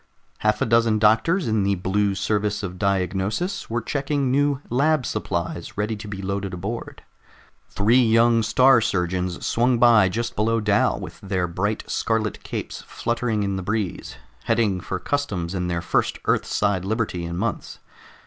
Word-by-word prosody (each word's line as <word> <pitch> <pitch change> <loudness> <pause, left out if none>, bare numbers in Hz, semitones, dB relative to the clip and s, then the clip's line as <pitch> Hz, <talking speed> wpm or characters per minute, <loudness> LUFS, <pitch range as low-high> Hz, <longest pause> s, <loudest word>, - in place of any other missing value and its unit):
Half 105 0 +1
a - - +1
dozen 115 -1 +3
doctors 110 - +3
in 110 -2 +1
the 100 0 +1
Blue 100 +2 0
Service 105 +1 -1
of 90 -1 -6
Diagnosis 100 - -1
were 115 0 -2
checking 140 -1 -1
new 140 0 +2
lab 140 +2 +2
supplies 85 -5 -4
ready 105 +2 -1
to 105 +1 -9
be 100 -1 -6
loaded 100 -1 -3
aboard. 105 +6 -6 0.7
Three 115 +5 +3
young 115 0 +4
Star 125 +3 +5
Surgeons 90 -2 -1
swung 120 +1 +2
by 115 -5 +5
just 115 +5 -3
below 115 +2 +1
Dal 100 - +2
with - - -9
their 95 -2 -1
bright 100 +5 -2
scarlet 110 -2 -1
capes - - -6
fluttering 115 -2 -1
in 100 -1 -1
the - - -3
breeze, 100 -1 -3 0.3
headed 100 -6 +1
for 95 - -3
customs 95 -8 -2
and 90 -2 -2
their 85 -1 -1
first - - 0
Earthside 100 -3 +1
liberty 105 -4 -2
in 85 0 -4
months. 115 +3 -3
105 Hz, 160 wpm, -23 LUFS, 95-115 Hz, 0.7 s, Star